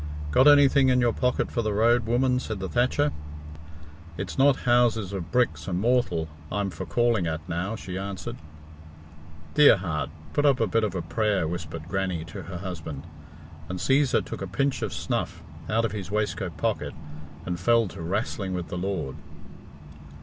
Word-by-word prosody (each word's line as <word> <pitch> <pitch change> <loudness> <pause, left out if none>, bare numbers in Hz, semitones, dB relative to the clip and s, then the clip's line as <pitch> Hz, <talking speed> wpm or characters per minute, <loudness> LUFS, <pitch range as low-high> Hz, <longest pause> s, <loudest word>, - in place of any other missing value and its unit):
"Got 130 - +5
anything 140 -2 +6
in 125 0 +4
your 120 -2 +3
pocket 125 0 0
for 120 - 0
the 110 -2 -1
road, 115 +2 +3
woman?" 125 +2 +2
said 110 -4 -4
the 95 - -3
thatcher. 130 - +1 1.1
"It's - - -4
not 135 0 +4
houses 120 -5 +3
of 90 -3 -5
bricks 90 - +1
and 90 -2 -1
mortal 115 -8 +1 0.2
I'm 100 -1 -1
for 90 +1 -7
calling 115 +1 +2
at 80 +1 -4
now," 90 +5 -2
she 95 -3 -6
answered. 100 +5 -5 1.2
"Dear 150 -7 +7
heart! 80 -6 -3 0.2
Put 145 - +1
up 140 -3 +4
a 115 - +3
bit 110 +2 +1
of 105 -3 -1
a 85 - -2
prayer," 105 0 0
whispered 80 -1 -5
Grannie 90 -3 -2
to 80 - -8
her 90 -1 -7
husband; 80 -6 -6 0.6
and 90 - -3
Cæsar 135 +6 +2
took - - -7
a 95 - -3
pinch 135 +9 0
of - - -2
snuff - - -3 0.3
out 115 +1 +2
of 110 - -2
his 100 -4 -5
waistcoat 105 -1 -2
pocket, - - -2 0.5
and 90 -1 -3
fell 115 +3 +3
to - - -11
"wrastling 95 +2 -2
with 90 -2 -4
the 90 - -4
Lord." 90 -8 -3
100 Hz, 175 wpm, -26 LUFS, 90-120 Hz, 1.2 s, Dear